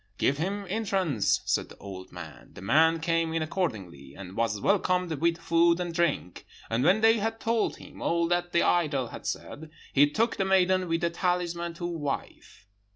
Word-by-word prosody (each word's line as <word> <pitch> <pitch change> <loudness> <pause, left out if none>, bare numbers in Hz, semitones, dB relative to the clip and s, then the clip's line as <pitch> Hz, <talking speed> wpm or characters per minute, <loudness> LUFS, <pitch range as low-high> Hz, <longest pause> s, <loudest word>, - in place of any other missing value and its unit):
"'Give 140 +2 +1
him 200 +4 -2
entrance!' 190 - 0
said - - 0
the - - -14
old 95 -2 -9
man. 85 -3 -11
The - - -10
man 160 +9 +4
came 165 0 0
in 165 -1 0
accordingly, 95 - -4
and 95 -1 -9
was 115 -3 0
welcomed 180 - +1
with 165 +2 +1
food 170 +1 +3
and 175 -1 -3
drink; 165 - -1 0.3
and 115 +3 +1
when 195 +8 +4
they 225 0 +5
had 225 +2 -2
told 225 -1 0
him - - -13
all 170 0 +1
that 175 0 0
the 170 - +3
idol 145 -8 +1
had - - -8
said, 160 +1 -5 0.2
he 145 +1 +5
took 230 +9 0
the 195 - 0
maiden 185 -1 +3
with 165 0 0
the 170 -1 0
talisman 170 -1 -1
to 175 - -5
wife. 155 - -5
170 Hz, 185 wpm, -27 LUFS, 140-180 Hz, 0.3 s, they